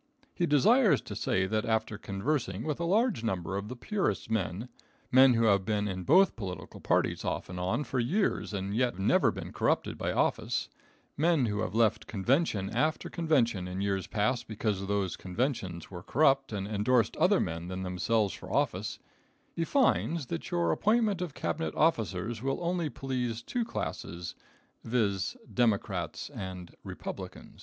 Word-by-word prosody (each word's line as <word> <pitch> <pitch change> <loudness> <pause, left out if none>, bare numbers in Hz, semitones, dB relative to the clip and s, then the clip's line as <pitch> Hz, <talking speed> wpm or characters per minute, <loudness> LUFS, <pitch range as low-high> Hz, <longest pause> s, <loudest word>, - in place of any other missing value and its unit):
He 175 - 0
desires 185 - +5
to 105 - -8
say 95 -3 +1
that 110 +3 0
after 110 -2 0
conversing 100 0 -2
with 155 -1 -2
a 170 - -1
large 210 - +2
number 95 -4 -2
of 100 +1 -3
the 125 - -6
purest 130 - -2
men, 105 +1 -1 0.4
men 130 -1 +7
who 115 - +2
have 100 -3 +4
been 105 0 0
in 95 -2 -4
both 185 +6 +5
political 95 -5 -7
parties - - +1
off - - -3
and 90 0 -5
on 95 +11 0
for 130 - -2
years 175 - 0
and 100 0 -3
yet 125 +1 +2
have - - -12
never 95 - +4
been - - -6
corrupted - - 0
by - - -1
office, - - 0 0.5
men 160 -3 +3
who 105 -2 -1
have 100 -1 -2
left 110 -2 +2
convention 110 - +1
after 150 +8 0
convention 125 - +1
in 90 +1 -4
years 100 -1 -1
past 120 +3 0
because 105 -3 -2
those 100 -2 0
conventions 95 - -3
were 90 -2 -7
corrupt 135 - +3
and 100 -2 -3
endorsed 110 +3 +2
other - - +4
men 85 +1 -3
than 95 +1 -4
themselves 95 +2 0
for - - -9
office, - - 0 0.6
he 165 - -1
finds 170 - +2
that 85 - -5
your 85 -1 +1
appointment 215 - +2
of 175 -6 -4
Cabinet 160 +1 -2
officers 110 - +1
will 135 +1 -1
only 170 -2 0
please 125 -3 -3
two 245 - -1
classes, 90 - -5 0.5
viz: 110 - 0 0.2
Democrats 115 -5 0
and 95 -2 -7
Republicans. - - -8
115 Hz, 165 wpm, -30 LUFS, 95-145 Hz, 0.6 s, men